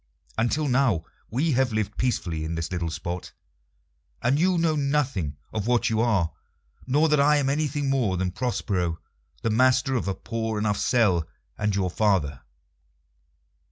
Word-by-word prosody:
Until 130 +7 +1
now 125 - +2 0.2
we 145 +8 +1
have 130 -1 +2
lived 110 -1 -2
peacefully 85 -10 -1
in 80 +1 -3
this 80 +1 -3
little 85 -2 -2
spot, 85 +3 -5 0.9
and 130 +5 +2
you 180 +1 +3
know 165 -2 +2
nothing 135 - 0 0.2
of 110 0 -2
what 120 -2 +2
you 110 0 +2
are, 100 -9 +2 0.6
nor 150 +5 +3
that 150 -1 +3
I 150 +2 +5
am 140 -2 +1
anything 145 -1 -1
more 125 -9 +1
than 90 0 -1
Prospero, 95 -6 -1 0.5
the 115 - +1
master 130 +3 +3
of 120 -6 -1
a 95 - -1
poor 110 -1 -3
enough 105 -1 0
cell, 95 -10 +2 0.3
and 105 -2 -1
your 95 -3 0
father." 85 - +1
115 Hz, 155 wpm, -25 LUFS, 95-135 Hz, 0.9 s, I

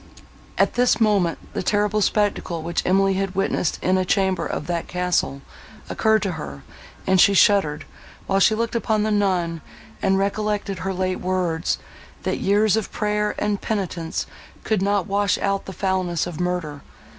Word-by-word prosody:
At - - +3
this 245 -2 +3
moment, 200 -6 +2 0.2
the - - -2
terrible 210 +2 +1
spectacle, 200 -5 0
which 170 +1 -1
Emily 195 +1 +3
had 190 0 -2
witnessed 195 -3 0
in 185 +1 +2
a - - +1
chamber 190 0 +1
of - - -4
that 170 0 -3
castle, 180 -6 -1 0.5
occurred 220 -2 +2
to 195 - -1
her, 70 - -7 0.4
and 190 -1 +4
she 200 - +5
shuddered, 160 -8 +3 0.4
while 195 - +1
she 215 +3 +4
looked 230 +1 -2
upon 220 -2 +1
the 215 - 0
nun—and 190 +1 -1
recollected 200 -1 -1
her 190 - -2
late 185 0 -1
words—that 180 -3 -3
"years 205 +2 +3
of 220 -2 -2
prayer 210 0 -1
and 210 -1 -1
penitence 185 -6 -3 0.4
could 215 -4 0
not 200 -2 +1
wash 200 0 +1
out 195 0 -1
the - - -7
foulness 185 -3 -1
of 175 -2 -7
murder." 180 -5 -2
195 Hz, 155 wpm, -22 LUFS, 180-210 Hz, 0.5 s, she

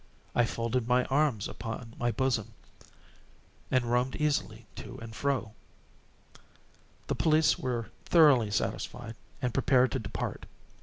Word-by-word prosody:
I 120 - +4
folded 115 +1 -1
my 125 0 +3
arms 135 -6 +1
upon 115 0 -6
my 120 - +1
bosom, 115 -2 -1 1.1
and 130 -2 +2
roamed 125 +2 +1
easily 140 -7 -1
to - - -8
and 115 0 -9
fro. 130 -4 -1 1.5
The - - -1
police 155 0 +3
were 120 -3 -3
thoroughly 145 -10 +6
satisfied 110 +2 -3 0.3
and 125 -2 0
prepared 130 -2 +3
to - - -1
depart. - - -5
120 Hz, 120 wpm, -30 LUFS, 115-135 Hz, 1.5 s, thoroughly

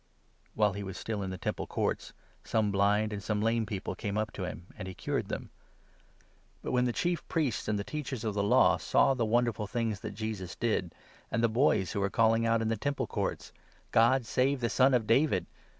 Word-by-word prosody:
' - - -38
' - - -36
While 105 -2 +3
he 100 - -5
was 95 -2 -6
still 110 -2 -3
in 95 - -3
the 95 - -5
Temple - - -3
Courts, - - -2 0.3
some 110 -2 +1
blind 105 +2 +2
and 100 - -4
some 105 0 -1
14 - - 0
lame 115 -1 0
people 100 -3 -4
came 105 0 -3
up 110 0 -1
to 95 - -4
him, 90 -1 -7
and 95 -4 -7
he 95 - -7
cured - - -2
them. - - -5 1.1
But, - - -3
15 - - -2
when 125 0 +3
the 125 - +1
Chief 175 +6 -1
Priests 150 -9 -1
and 105 -1 +1
the 100 - -2
Teachers 135 -3 -5
of 110 -2 -1
the 100 - 0
Law 100 - +5
saw 135 - +3
the 120 -3 0
wonderful 115 -2 +1
things 110 -2 -2
that 105 -2 -7
Jesus 105 -5 -4
did, 100 -7 -1 0.3
and 115 - 0
the - - +6
boys 110 -5 +2
who 100 - -2
were 100 0 +1
calling 115 +2 +3
out 115 0 +2
in - - -1
the 115 0 0
Temple 140 +5 -1
Courts - - -3 0.2
" - - -33
God 120 +2 +4
save 135 +4 +1
the 120 -1 0
Son 130 0 +4
of 115 -3 +1
David 135 +8 +3
110 Hz, 235 wpm, -30 LUFS, 100-120 Hz, 1.1 s, the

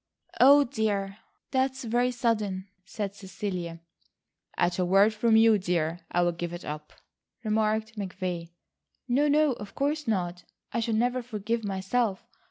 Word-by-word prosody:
"Oh, 285 +3 +8
dear. 205 -4 -2 0.3
That's 265 0 0
very 240 +2 +1
sudden," 215 -6 -1 0.2
said 200 -2 -4
Cecilia. 185 -4 -5 0.8
"At 175 +1 +1
a - - +3
word 195 +4 +4
from 225 +1 +3
you, 225 -1 +6
dear, 175 -2 -1
I'll 175 0 +2
give 175 0 -5
it 175 - -7
up," 150 0 -6 0.5
remarked 215 0 0
McVay. 180 -3 -4 0.6
"No, 270 +4 +3
no, 300 0 +4
of 205 -4 -10
course 295 +1 -1
not. 180 -4 -1 0.3
I - - +1
should 225 -1 0
never 245 +3 +1
forgive 225 -1 -3
myself. 195 +2 -1
210 Hz, 140 wpm, -28 LUFS, 185-235 Hz, 0.8 s, Oh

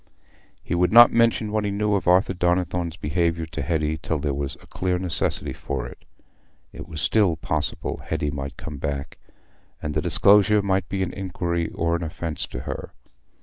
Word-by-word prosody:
He - - -3
would 90 0 +2
not 120 +1 +9
mention 115 -2 +2
what 110 0 0
he 105 - -1
knew 105 +1 0
of 95 -4 0
Arthur 90 +2 +4
Donnithorne's 90 -1 0
behaviour 85 +2 0
to 80 - -6
Hetty 80 -2 -1
till 80 - -1
there 75 -1 -1
was 70 0 -3
a - - -18
clear 90 -1 -1
necessity 90 -3 -2
for 65 -3 -4
it: - - -12 0.7
it - - -9
was 80 -1 -6
still 95 0 +3
possible 80 - -2
Hetty 75 -2 -1
might 70 -1 -6
come 75 -3 -7
back, 70 -1 -4 0.6
and 75 - -4
the - - 0
disclosure 105 +1 +5
might 95 -3 0
be 95 0 -1
an 90 - -4
injury 85 -3 -2
or 85 0 0
an 85 - -3
offence 80 -2 -4
to - - -6
her. - - -6
85 Hz, 185 wpm, -24 LUFS, 75-95 Hz, 0.7 s, not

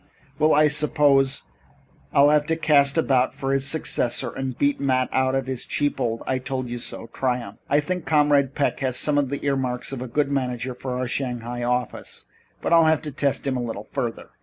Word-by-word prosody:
"Well, 155 0 +4
I 150 +1 +5
suppose 150 -3 +2 0.7
I'll 140 +1 +5
have 150 0 +2
to 165 - +1
cast 145 -2 +3
about 130 -5 +2
for 135 0 -2
his 135 0 0
successor 140 -6 0
and 130 -2 -5
beat 145 0 +1
Matt 130 -2 +1
out 130 0 +1
of 135 -1 -1
his 130 -2 -4
cheap 145 0 -1
'I 120 +2 -1
told 130 -1 -4
you 120 - -4
so' 115 - -5
triumph. 125 -5 -2
I 145 - +4
think 180 +2 -4
Comrade 145 -3 +3
Peck 145 - 0
has 130 -2 -1
some 145 -1 +2
of 140 -3 0
the 140 +1 -4
earmarks 130 -3 -1
of 135 -3 -5
a 130 - -4
good 140 +3 0
manager 125 -2 -2
for 125 0 -5
our 130 0 -2
Shanghai 120 -2 -3
office, 125 0 -3 0.4
but - - +1
I'll 165 -1 +6
have 160 0 +2
to 150 - -5
test 140 0 -1
him 135 -2 0
a 125 - -1
little 115 -3 -5
further." 120 -3 -5
135 Hz, 205 wpm, -23 LUFS, 125-145 Hz, 0.7 s, I'll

